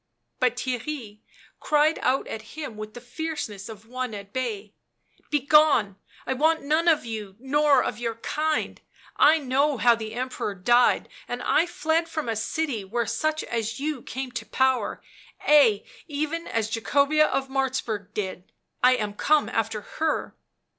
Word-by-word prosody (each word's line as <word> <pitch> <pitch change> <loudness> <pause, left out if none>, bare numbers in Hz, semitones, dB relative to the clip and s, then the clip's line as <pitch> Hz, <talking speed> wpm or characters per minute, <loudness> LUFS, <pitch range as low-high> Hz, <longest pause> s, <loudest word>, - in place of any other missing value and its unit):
But 250 -2 +2
Theirry 245 -3 -4 0.4
cried 305 +1 +2
out 260 +2 +1
at 220 +6 -8
him 300 -8 -5
with 215 +1 -8
the - - -6
fierceness 245 - -5
of 220 -1 -10
one 255 -2 -4
at 200 0 -9
bay: 215 -5 -3 0.3
" - - -36
Begone, 290 -7 +4 0.3
I - - 0
want 315 +4 +2
none 310 +4 +1
of 315 -6 +4
you 215 -4 -6
nor 285 +3 +3
of 210 - -3
yeur 230 -1 -2
kind; 305 +7 -2 0.4
I 310 +3 +6
know 280 0 +1
how 240 +1 +5
the 220 -1 -5
Emperor 250 -5 -3
died, 240 +7 +3 0.2
and - - -4
I 345 - +3
fled 330 0 0
from 310 -5 -3
a 225 - -1
city 230 +1 -2
where 230 +5 -2
such 310 +4 -1
as 225 0 -3
you 295 -2 -2
come 260 +1 -5
to 245 - -5
power, 260 -1 +1 0.4
ay, 255 -9 +5 0.2
even 310 +2 -3
as 220 -1 -1
Jacobea 285 +6 +3
of 270 0 -1
Martzburg 255 -7 -2
did 190 -3 -4
— - - -44
I 255 0 +7
am 210 -4 -3
come 300 +8 +2
after 225 -1 -1
her." 315 +8 -2
255 Hz, 160 wpm, -25 LUFS, 220-300 Hz, 0.4 s, I